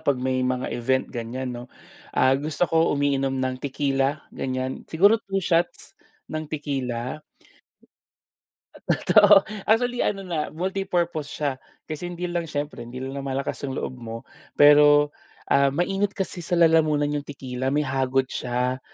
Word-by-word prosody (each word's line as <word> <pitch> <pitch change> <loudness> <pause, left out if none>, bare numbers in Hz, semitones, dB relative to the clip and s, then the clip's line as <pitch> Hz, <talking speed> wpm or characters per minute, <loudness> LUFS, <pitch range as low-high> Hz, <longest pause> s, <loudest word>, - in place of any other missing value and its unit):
'pag, 140 -2 +1
may 130 0 -1
mga 130 0 -1
event, 130 +2 0
ganyan 125 +2 -4
'no, 120 0 -7 0.5
ah, 130 0 +5
gusto 155 +4 -1
ko 165 +1 +3
umiinom 135 -1 0
ng 130 -1 -1
tequila, 135 0 -1
ganyan. 130 0 -4
Siguro 200 +7 +4
2 195 -2 -2
shots 175 0 0 0.4
ng 155 -1 -4
tequila. 135 -3 -3 1.6
Totoo, 205 -2 +5 0.2
actually, 245 +2 +2
ano 195 -1 -1
na, 165 -4 -2
multi-purpose 175 -3 -2
siya, 145 -1 -2 0.3
kasi 155 +3 -5
hindi 175 0 -6
lang 175 -2 -2
siyempre 145 -3 -4
hindi 125 +2 -7
lang 135 - -5
lumalakas 135 0 -3
yung 135 - -4
loob - - -3
mo, 115 -1 -6 0.4
pero, 145 0 +6 0.4
ah, 140 0 +5
mainit 195 +7 -1
kasi 190 -2 -3
sa 170 +1 -1
lalamunan 155 -3 +3
yung 145 - -2
tequila, 130 -2 -4
may 145 +2 +1
hagod 130 0 0
siya. 125 +1 -1
145 Hz, 145 wpm, -24 LUFS, 130-170 Hz, 1.6 s, pero